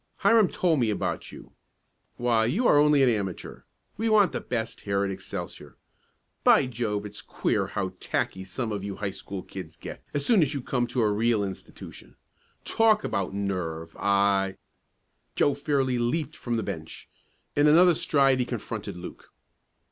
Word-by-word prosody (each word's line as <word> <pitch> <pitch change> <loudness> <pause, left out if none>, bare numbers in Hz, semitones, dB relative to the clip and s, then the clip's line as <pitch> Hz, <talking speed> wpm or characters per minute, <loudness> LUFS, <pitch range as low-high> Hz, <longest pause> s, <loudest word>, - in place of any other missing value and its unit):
Hiram 225 -4 +5
told 170 -5 +1
me 115 -3 +2
about 105 - -2
you. - - -12 0.7
Why, 120 -2 +2
you 190 - +1
are 145 - +6
only 150 -2 +5
an 130 - +5
amateur. 100 -6 -3 0.4
We 225 +2 0
want 210 -4 +5
the - - -3
best 115 -2 -4
here 100 -1 0
at 100 - -2
Excelsior. 95 0 -7 0.7
By - - +6
Jove, 110 -4 -3
it's 105 - -8
queer - - -1
how - - -3
tacky 95 - -2
some 110 +5 -4
of 100 -2 -3
you 100 -1 -4
high 100 -2 -3
school 95 0 -7
kids 85 -5 -9
get - - -9
as 145 -1 -1
soon 220 -6 +4
as 145 -1 +1
you 140 - -2
come 125 -2 0
to 120 0 0
a 105 - +2
real 110 0 +2
institution. 95 -2 -9 0.5
Talk 220 -1 +3
about 100 -2 -2
nerve, 85 -5 -3
I 100 -1 +2 0.4
" - - -47
Joe 145 - +3
fairly 140 -4 0
leaped 145 +5 -1
from 120 -1 -3
the 115 - -1
bench. - - -7 0.5
In 145 +1 +4
another 175 +4 +7
stride 135 -4 +2
he 125 - +1
confronted 105 -5 -5
Luke. 90 - -10
115 Hz, 170 wpm, -26 LUFS, 100-145 Hz, 0.7 s, another